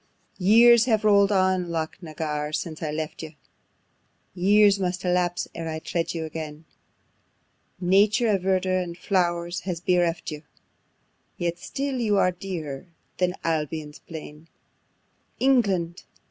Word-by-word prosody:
5. - - -19
Years 230 +4 +7
have 220 -4 +1
roll'd 200 -1 +5
on, 185 -2 +2
Loch 160 -1 -3
na 160 -3 -9
Garr, 150 -1 -3
since 155 0 -4
I 155 - -2
left 155 +1 -4
you, 155 -1 -9 1.0
Years 200 +2 +4
must 185 0 -2
elapse, 180 -1 0
ere 165 -1 -5
I 160 - -3
tread 165 +2 -3
you 160 -1 -3
again: 155 0 -7 1.1
Nature 205 +6 +3
of 195 -3 +2
verdure 185 0 +1
and 170 -1 -6
flowers 175 -2 0
has 180 -3 -4
bereft 175 -2 0
you, 150 -1 -7 1.0
Yet 175 0 -2
still 275 -1 -3 0.2
are 185 - +4
you - - -5
dearer 160 -7 -5 0.3
than 180 0 +1
Albion's 155 -2 -3
plain: 155 -1 -10 0.9
England! 195 -10 +2
175 Hz, 135 wpm, -25 LUFS, 160-195 Hz, 1.1 s, Years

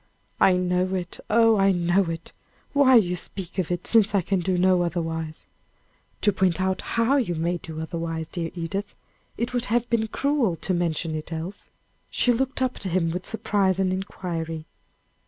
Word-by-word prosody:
"I 190 - +6
know 180 +1 +1
it 180 -1 -5
oh! 225 0 +5
I 195 0 +4
know 175 +2 +2
it; 165 0 -5 0.4
why 260 -4 +7
do 210 - +1
you 180 +1 -2
speak 185 +1 -5
of 180 - -1
it, 175 0 -2
since 220 -2 +4
I 195 - +3
can 195 +2 0
do 180 +1 0
no 185 0 +4
otherwise?" 165 -2 -3 0.8
"To 205 - +3
point 185 -2 +1
out 190 0 0
how 235 +4 +1
you 210 -11 0
may 170 +2 0
do 160 -2 -8
otherwise, 165 -1 -4
dear 165 0 -4
Edith. 195 +4 -4 0.4
It 235 +3 -2
would 245 -1 0
have 240 +1 +1
been 225 -1 +2
cruel 275 - +1
to 185 - -2
mention 165 -2 -1
it 155 +1 -5
else." 165 +5 -6 0.4
She 245 - +2
looked 260 +2 -1
up 255 -1 -1
at - - -7
him 175 -2 +1
with 180 +2 -4
surprise 205 -4 +1
and 190 -1 +1
inquiry. 165 -4 -4
185 Hz, 185 wpm, -25 LUFS, 170-210 Hz, 0.8 s, why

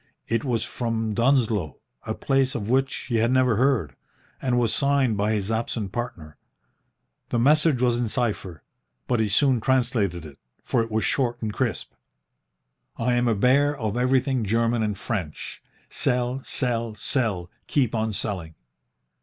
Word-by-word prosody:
It 115 +1 0
was 120 -5 0
from 115 -2 -2
Dunsloe, 115 - +1 0.3
a - - -2
place 135 -1 +1
of 110 -1 -3
which 135 +1 +2 0.2
he 120 - 0
had 115 +1 +2
never 130 -4 +3
heard, 120 - +1 0.5
and 125 -2 +1
was 115 -2 +2
signed 140 -4 +2
by 105 +2 +1
his 105 0 -1
absent 110 -3 -2
partner. 85 -11 -6 0.9
The - - 0
message 145 +1 +4
was 120 -1 +2
in 120 -2 -1
cipher, 105 -8 -2 0.4
but 120 -2 +1
he 110 -1 +1
soon 130 +3 +3
translated 115 -10 +1
it, 70 -3 -12 0.2
for - - +1
it 115 - -3
was 110 0 0
short 120 -3 0
and 110 -2 -3
crisp. - - -2 1.1
"I 125 +2 +1
am 120 0 +2
a 115 - +2
bear 140 +7 +3
of 110 -4 -2
everything 130 0 +1
German 115 +2 +1
and 105 -2 -1
French. 95 -9 -5 0.3
Sell, 125 +1 0
sell, 115 -4 -1
sell, 105 -6 -2 0.2
keep 130 -6 +1
on 110 -1 0
selling." 90 -6 -4
115 Hz, 155 wpm, -25 LUFS, 105-125 Hz, 1.1 s, message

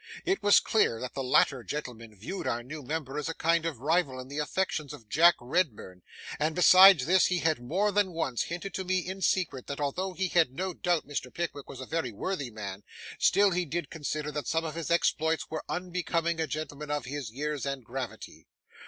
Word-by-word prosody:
It 385 +1 +1
was 205 - +6
clear 165 - +1
that 125 - -5
the 135 - -3
latter 130 0 +3
gentleman 115 -7 -6
viewed 110 - -5
our 120 0 -1
new 150 +5 -8
member 145 0 -4
as 150 - -3
a 165 - -4
kind 165 0 +1
of 145 -8 -5
rival 145 -3 +1
in 130 +1 -9
the 145 +2 -4
affections 150 -2 -2
of 110 - -12
Jack 170 +9 +6
Redburn, 120 - -2 0.4
and 155 +1 0
besides 185 -4 +8
this, 185 +4 +4
he 180 - 0
had 160 -6 0
more 190 +12 0
than 200 -2 +2
once 145 -8 -1
hinted 175 +4 -5
to 190 - -3
me, 185 0 0
in 190 +1 -6
secret, 170 -10 0
that 140 - -5
although 180 +7 -2
he 190 0 -1
had 165 -8 +3
no 185 +2 -2
doubt 175 -3 0
Mr. 135 -3 -4
Pickwick 160 -5 -5
was 130 - -9
a - - -6
very 160 -4 -2
worthy 145 - -3
man, 100 -3 -7 0.4
still 200 -1 +4
he 180 0 0
did 170 +2 -4
consider 150 -1 -3
that 150 0 -4
some 160 +1 0
of 155 - -4
his 165 -2 -5
exploits 160 -1 +1
were 155 - -4
unbecoming 170 -2 -1
a 160 - 0
gentleman 150 0 -5
of 145 -4 -2
his 135 -2 -5
years 145 +4 -3
and 140 -2 -3
gravity. 130 +1 -7
155 Hz, 210 wpm, -29 LUFS, 135-175 Hz, 0.4 s, besides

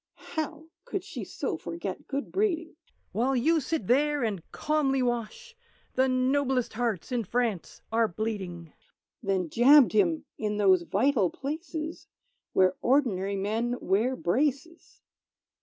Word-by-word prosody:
(How 315 -1 -3 0.2
could - - -4
she - - -7
so - - -3
forget 335 - -6
good 280 0 -4
breeding?) 350 -6 0 0.4
"While 245 +7 +1
you 315 +7 +3
sit 315 - -2
there 290 +4 +2
and 205 -6 -1
calmly 275 -4 +1
wash, 245 - -3 0.4
The 260 +1 +3
noblest 255 0 +1
hearts 230 -3 -2
in 245 -2 0
France 225 -3 -2
are 225 0 +3
bleeding!" 185 -5 -5 0.5
Then 190 -3 0
jabbed 255 - +6
him 180 -7 +2
in 210 -1 -1
those 190 -3 +5
vital 205 +2 +2
places 315 - -5 0.4
Where 185 -1 +3
ordinary 210 -8 +2
men 220 +5 -1
wear 220 +8 +1
braces! 280 - -2
245 Hz, 125 wpm, -28 LUFS, 205-290 Hz, 0.5 s, jabbed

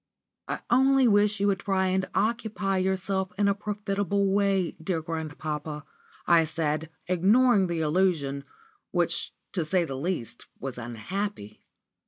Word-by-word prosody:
"I - - -3
only 265 +1 +5
wish 205 -1 +3
you 200 - +1
would 200 -1 +2
try 190 -2 0
and 190 +1 0
occupy 210 -2 0
yourself 190 0 -1
in 205 0 +3
a 200 - +4
profitable 200 -1 -1
way, 195 -3 +2
dear 170 -1 0
grandpapa," 155 -2 -5 0.4
I 170 -1 +5
said, 155 0 -2 0.2
ignoring 195 +3 +4
the 170 -2 -2
allusion, 150 -4 +1 0.5
which, - - 0 0.2
to 175 - 0
say 175 +2 +1
the 135 -4 -5
least, 135 -5 -3
was 130 -2 -5
unhappy. 120 - -5
190 Hz, 135 wpm, -27 LUFS, 155-200 Hz, 0.5 s, only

